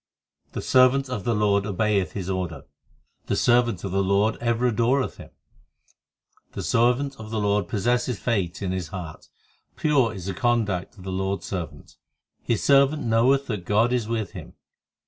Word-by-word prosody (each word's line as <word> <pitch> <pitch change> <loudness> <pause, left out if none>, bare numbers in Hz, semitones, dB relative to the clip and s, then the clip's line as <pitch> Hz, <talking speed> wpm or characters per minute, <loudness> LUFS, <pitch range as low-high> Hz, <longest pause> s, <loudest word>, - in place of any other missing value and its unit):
3 - - -42
The - - -4
servant 130 +1 +4
of 105 -7 -4
the 115 - +1
Lord 100 -1 +2
obeyeth 105 -1 0
His 95 -3 -5
order, 90 -7 -3 0.6
The - - 0
servant 120 -6 +2
of 95 - -4
the 95 +1 +1
Lord 100 +3 +2
ever 120 +1 0
adoreth 125 +4 +1
Him, - - -11 1.2
The - - -5
servant 125 +4 +1
of 110 0 -8
the 110 -1 -2
Lord 105 0 +1
possesseth 120 +2 0
faith 100 -6 -2
in 95 - -1
his 95 -3 -3
heart; 90 -6 -8 0.5
Pure 135 -8 +2
is 90 -2 -7
the 95 - -3
conduct 110 -5 -1
of 95 - -12
the 95 - -5
Lord 95 +1 -2
s - - -10
servant: 80 -6 -7 0.4
His 115 - -1
servant 140 +2 +4
knoweth 125 +5 +3
that 105 -6 -4
God 110 +6 +2
is 120 -4 0
with 110 -4 -2
him. - - -10
110 Hz, 175 wpm, -24 LUFS, 95-120 Hz, 1.2 s, servant